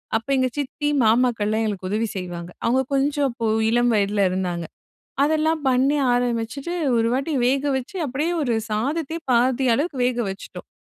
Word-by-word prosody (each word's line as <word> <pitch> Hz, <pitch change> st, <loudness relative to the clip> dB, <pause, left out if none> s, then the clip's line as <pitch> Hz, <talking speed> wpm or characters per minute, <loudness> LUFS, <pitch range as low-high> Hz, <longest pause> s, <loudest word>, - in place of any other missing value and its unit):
அப்போ 225 Hz, +4 st, -2 dB
எங்கள் 255 Hz, -2 st, +1 dB
சித்தி 290 Hz, +1 st, -3 dB, 0.2 s
மாமாக்கள்லாம் 225 Hz, -2 st, +2 dB
எங்களுக்கு 200 Hz, -4 st, -3 dB
உதவி 220 Hz, +3 st, 0 dB
செய்வாங்க. 175 Hz, -1 st, -6 dB
அவுங்க 255 Hz, +3 st, +3 dB
கொஞ்சம் 285 Hz, +1 st, +1 dB
அப்போ 235 Hz, -1 st, -4 dB, 0.2 s
இளம் 240 Hz, +1 st, +3 dB
வயதில 205 Hz, 0 st, +1 dB
இருந்தாங்க. 180 Hz, -2 st, -2 dB, 0.6 s
அதெல்லாம் 315 Hz, +2 st, +2 dB
பண்ணி 265 Hz, +3 st, +3 dB, 0.2 s
ஆரம்பிச்சுட்டு, 245 Hz, +6 st, -1 dB, 0.2 s
ஒரு 230 Hz, 0 st, +2 dB
வாட்டி 275 Hz, +5 st, -1 dB
வேக 270 Hz, +2 st, +2 dB
வச்சு 265 Hz, +8 st, -6 dB
அப்பிடியே 295 Hz, +5 st, -1 dB
ஒரு 245 Hz, -5 st, 0 dB, 0.2 s
சாதத்தையே 290 Hz, +9 st, -2 dB
பாதி 250 Hz, +2 st, +2 dB
அளவுக்கு 290 Hz, +2 st, -2 dB
வேக 245 Hz, -1 st, 0 dB
வச்சுட்டோம். 195 Hz, -, -9 dB
245 Hz, 150 wpm, -22 LUFS, 220-280 Hz, 0.6 s, அவுங்க